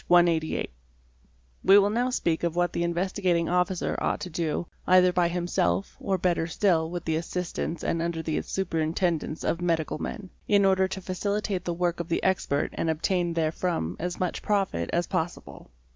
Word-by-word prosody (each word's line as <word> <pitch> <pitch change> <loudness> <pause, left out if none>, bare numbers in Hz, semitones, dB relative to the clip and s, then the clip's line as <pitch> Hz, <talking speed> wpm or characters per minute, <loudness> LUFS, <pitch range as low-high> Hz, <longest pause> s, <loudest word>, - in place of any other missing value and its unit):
188); 170 - +3 0.9
we 195 +1 +7
will 205 0 +4
now 245 +3 +1
speak 170 -10 0
of 170 -1 0
what 175 0 +1
the - - -1
Investigating 175 0 0
Officer 180 0 0
ought - - 0
to 180 - -6
do, 160 +1 -1 0.2
either 180 0 +6
by 175 -1 +3
himself 170 - 0
or 195 -2 0
better 170 -2 +1
still 165 -2 +2
with 175 0 -5
the 160 - 0
assistance 170 0 -3
and 165 - 0
under 165 -1 -2
the 155 -2 -1
superintendence 165 -2 -1
of 170 - -1
medical 165 -3 0
men, 205 -5 -6 0.2
in 200 -1 +4
order 190 0 +4
to 190 0 -5
facilitate 195 0 -2
the 175 - -1
work 175 0 0
of 170 0 -4
the 170 - 0
expert 180 -6 +1
and 165 - -1
obtain 170 +2 0
therefrom 160 - -1
as 175 +1 -3
much 180 -2 -2
profit 195 - 0
as 175 +1 +1
possible. 175 -3 -4
175 Hz, 175 wpm, -27 LUFS, 165-185 Hz, 0.9 s, we